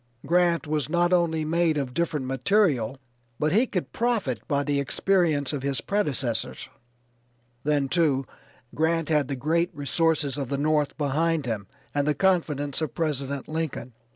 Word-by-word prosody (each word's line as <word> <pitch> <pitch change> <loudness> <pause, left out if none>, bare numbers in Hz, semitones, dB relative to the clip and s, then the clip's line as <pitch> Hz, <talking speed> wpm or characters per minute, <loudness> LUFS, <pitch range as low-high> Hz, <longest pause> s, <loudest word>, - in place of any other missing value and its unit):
Grant 175 -1 +2
was 150 -1 -1
not 175 +2 +2
only 165 -3 +2
made 165 0 +2
of 135 -3 -2
different 155 -4 -1
material 135 - +1 0.4
but 150 0 +1
he 230 +7 +3
could 180 -6 -3
profit 215 - 0
by 140 -1 +1
the 145 -1 0
experience 155 0 +1
of 145 - -2
his 140 0 -1
predecessors. 140 - -2 1.0
Then, 145 -2 +1
too, 140 -4 +2 0.5
Grant 165 +1 +1
had 150 -4 +2
the 140 - -2
great 165 +6 +1
resources 145 -1 0
of 135 -3 -3
the 140 - -1
North 150 0 +1
behind 155 +2 +1
him 110 -5 -3 0.3
and 145 0 0
the 150 - +2
confidence 155 -7 +1
of 155 - -3
President 140 -4 -2
Lincoln. 155 -6 -4
150 Hz, 155 wpm, -26 LUFS, 140-170 Hz, 1.0 s, he